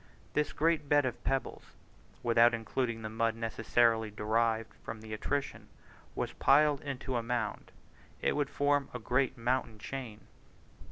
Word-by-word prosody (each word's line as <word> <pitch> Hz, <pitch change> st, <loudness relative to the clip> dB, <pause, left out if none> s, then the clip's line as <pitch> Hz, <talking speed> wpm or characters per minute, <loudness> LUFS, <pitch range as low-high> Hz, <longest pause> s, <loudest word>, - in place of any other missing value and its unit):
If -, -, -31 dB
this 150 Hz, -1 st, +1 dB
great 155 Hz, -2 st, +1 dB
bed 145 Hz, -2 st, +4 dB
of 130 Hz, -, -4 dB
pebbles, 135 Hz, 0 st, -1 dB, 0.6 s
without 115 Hz, 0 st, +5 dB
including 115 Hz, 0 st, -2 dB
the -, -, -3 dB
mud 115 Hz, +1 st, 0 dB
necessarily 115 Hz, 0 st, +2 dB
derived 110 Hz, +2 st, 0 dB
from 110 Hz, -, -6 dB
their 110 Hz, 0 st, -8 dB
attrition, 140 Hz, +6 st, -3 dB, 0.5 s
was -, -, -2 dB
piled 145 Hz, 0 st, +4 dB
into 135 Hz, -3 st, -3 dB
a -, -, 0 dB
mound, 115 Hz, -2 st, -3 dB, 0.5 s
it -, -, +1 dB
would 145 Hz, -2 st, 0 dB
form 145 Hz, -1 st, +1 dB
a -, -, -3 dB
great 125 Hz, +3 st, +1 dB
mountain 115 Hz, -1 st, -1 dB
chain! 115 Hz, -2 st, -6 dB
120 Hz, 150 wpm, -32 LUFS, 115-135 Hz, 0.6 s, without